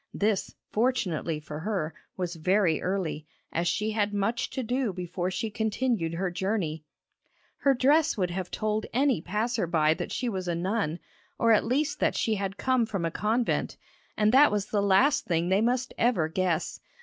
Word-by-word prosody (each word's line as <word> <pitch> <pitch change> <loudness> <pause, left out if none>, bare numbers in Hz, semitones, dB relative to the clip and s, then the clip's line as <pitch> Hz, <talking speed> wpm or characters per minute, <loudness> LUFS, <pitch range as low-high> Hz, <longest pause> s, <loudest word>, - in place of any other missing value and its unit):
This, 205 -1 0 0.2
fortunately 195 -10 0
for 150 0 -7
her, 180 -4 -2 0.2
was 180 -2 -3
very 180 0 +2
early, 180 -5 -2 0.2
as 170 +1 0
she 210 +5 0
had 210 -1 0
much 225 +4 0
to 260 - -4
do 245 -1 0
before 180 0 -3
she 200 +4 -3
continued 220 -5 -1
her 185 +1 -1
journey. 175 -5 -2 0.7
Her 275 -1 +3
dress 290 +4 +3
would 180 -3 0
have 180 0 -4
told 215 0 -2
any 265 - +2
passer 210 +2 -1
by 160 -2 +3
that - - -5
she 255 - -2
was 190 -5 -3
a 170 - 0
nun, 175 -2 -1 0.4
or 230 - +3
at 215 - +4
least 285 +5 0
that - - +1
she 225 - +1
had 195 -1 -3
come 255 -3 +1
from 195 -6 -2
a 165 - -1
convent, 225 +7 0 0.4
and 215 0 +3
that 280 +4 +6
was 205 -1 0
the 205 - +2
last 260 +10 +3
thing 170 0 0
they 190 +2 +3
must 245 +2 0
ever 225 -10 +2
guess! 170 0 -1
200 Hz, 180 wpm, -28 LUFS, 175-230 Hz, 0.7 s, that